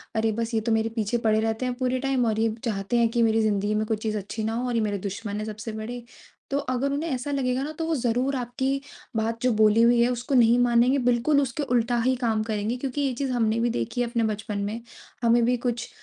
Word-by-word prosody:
"अरे 220 0 +2
बस 230 +2 -3
ये 220 - +1
तो 230 - -1
मेरे 220 0 +2
पीछे 220 +1 0
पड़े 220 -2 +2
रहते 225 +2 -1
हैं 250 - -1
पूरे 255 0 0
टाइम 270 -2 +1
और 220 -1 0
ये 225 0 +1
चाहते 210 +1 -1
हैं 235 -1 +3
कि 235 +1 0
मेरी 225 0 +3
ज़िंदगी 210 -1 +1
में 215 +1 0
कोई 220 0 -1
चीज़ 215 0 -2
अच्छी 210 +2 -5
ना 220 +1 -1
हो, 245 +2 -2
और 245 - -1
ये 230 - +2
मेरे 205 -2 -1
दुश्मन 205 +1 -5
है 215 - -3
सबसे 215 +1 -6
बड़े।" 225 +3 -6 0.5
तो 275 - +1
अगर 270 0 -1
उन्हें 300 +4 -2
ऐसा 260 0 -3
लगेगा 260 -2 0
ना 300 - -4
तो 325 - -1
वो 325 - +1
ज़रूर 250 +1 0
आपकी 260 +2 -2 0.3
बात 225 +1 -1
जो 250 - +2
बोली 215 +1 +5
हुई 235 0 +5
है 240 - +4
उसको 245 +3 -2
नहीं 235 -1 +5
मानेंगे 245 +2 +4
बिल्कुल 245 +4 +3
उसके 275 +2 -2
उल्टा 240 -2 +1
ही 260 0 +3
काम 230 -3 0
करेंगे। 220 +2 -2
क्योंकि 270 +2 -3
ये 275 -2 0
चीज़ 265 +2 -2
हमने 230 -2 +1
देखी 120 - -2
है 245 - 0
अपने 235 -1 0
बचपन 210 0 -5
में। 215 +3 -4 0.4
हमें 235 0 +4
भी 250 +1 +2
कुछ 240 -1 -3
235 Hz, 250 wpm, -25 LUFS, 220-250 Hz, 0.5 s, बोली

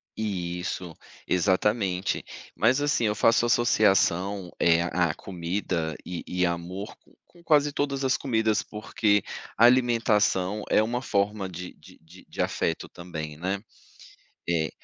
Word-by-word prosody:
Isso, 90 -4 -4 0.3
exatamente. 95 0 +1 0.3
Mas, 125 +6 +3
assim, 145 -5 +1
eu 105 - +2
faço 115 +2 +3
associação, 100 -5 +2
eh, 85 0 +4
à 85 -2 0
comida 85 -3 -3
e 90 -1 -5
e 90 0 0
amor 90 +4 -4
com - - -26
com 175 -1 -21
quase 150 -3 +3
todas 140 -1 -2
as 130 - +2
comidas, 110 -4 +1
porque 105 -1 0 0.3
a 115 - +6
alimentação 110 -5 +3
é - - +5
uma 120 +3 -1
forma 100 -1 0
de 90 0 -8
de - - -18
de 85 +4 -17
de - - -4
afeto 80 - -1
também, 80 -4 -7
né, 95 +4 -2 0.9
é. 80 -2 +1
100 Hz, 135 wpm, -26 LUFS, 90-110 Hz, 0.9 s, a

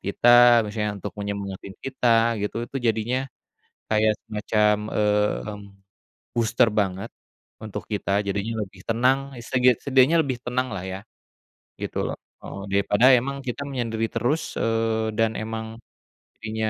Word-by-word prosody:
kita 120 +3 +6
misalnya 105 -1 -3
untuk - - -5
menyemangatin 100 -1 -5
kita 115 -3 +2
gitu 115 +3 -3
itu - - -6
jadinya, 115 +4 0 0.7
kayak 110 0 +3
semacam, 105 0 +1
mmm, 105 0 0 0.7
booster 115 +1 +3
banget 95 -1 -3 0.5
untuk, 105 -3 -6
kita 100 -1 0
jadinya 100 +3 -2
lebih 95 -1 -9
tenang 125 +4 +3 0.2
seget 125 0 +2
setidaknya 135 +4 +4
lebih 130 -3 -3
tenang 125 +1 -1
lah 90 - -5
ya, 95 +1 -5 0.8
gitu - - -4
loh, - - -4 0.3
heeh, 100 - -8
daripada 100 +4 +3
emang 140 +3 -4
kita 125 +3 -4
menyendiri 115 -4 -2
terus, 125 +8 -1
eee, 115 -1 0
dan 110 0 +2
emang, 110 0 -5 0.6
jadinya, 110 0 -3
110 Hz, 130 wpm, -24 LUFS, 105-120 Hz, 0.8 s, kita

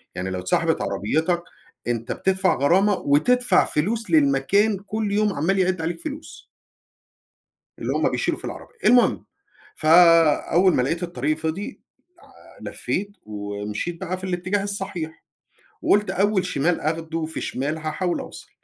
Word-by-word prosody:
يعني 90 +1 -3
لو 95 -1 -3
اتسحبت 90 0 0
عربيتك 160 - -1 0.4
أنت 115 -1 -2
بتدفع 190 -2 +1
غرامة 185 +9 +3
وتدفع 240 - +3
فلوس 210 +6 -1
للمكان 160 +8 +3
كل 210 +1 -3
يوم 210 0 +1
عمّال 180 +6 0
يعِد 185 -2 +1
عليك 165 +1 -3
فلوس. 305 0 -8 1.3
اللي - - -3
هُم - - +1
بيشيلوا - - -1
في - - -14
العربية. - - -8
المهم 245 0 +4 0.5
فأول 165 +2 +5
ما - - +2
لقيت 165 +7 -1
الطريق 170 -3 -1
فِضي 165 - -4 0.8
لع - - -6
لفّيت 205 +1 -3
ومشيت 105 +10 -5
بقى 185 -1 -3
في 185 - -6
الاتجاه 185 +2 -1
الصحيح، 195 -5 -5 0.6
وقُلت 210 +1 +2
أول 200 0 +1
شمال 175 -1 0
آخده 160 +1 -2
في 160 +1 -5
شمال، 145 +4 -3
هاحاول 160 +3 -2
أوصل. - - -10
175 Hz, 135 wpm, -23 LUFS, 155-195 Hz, 1.3 s, فأول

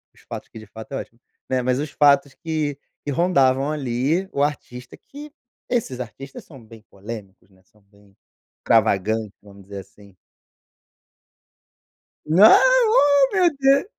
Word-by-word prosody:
os - - -22
fatos - - -8
que - - -13
de 110 - -12
fato 110 +5 -12
é - - -2
ótimo, 115 - -10 0.3
né, 130 -1 0
mas 125 0 0
os 150 0 -4
fatos 140 0 +3
que 155 -4 -3 0.3
que 145 - -2
rondavam, 140 -4 +2
ali, 145 +6 -1
o 140 - 0
artista 125 -4 -5
que, 295 +1 -13 0.4
esses 210 - -2
artistas 135 +4 -10
são 135 -6 -15
bem 110 -1 -16
polêmicos, 100 -2 -10
né, 95 -1 -26
são 105 +3 -30
bem, 100 0 -26 0.5
extravagantes, 110 -1 +1
vamos 100 -1 -16
dizer 100 0 -8
assim. 100 0 -18 2.1
Ah, 190 +8 +7 0.3
ó 285 - +4
meu 360 -3 +4
Deus. 275 +3 +3
130 Hz, 145 wpm, -21 LUFS, 105-155 Hz, 2.1 s, Ah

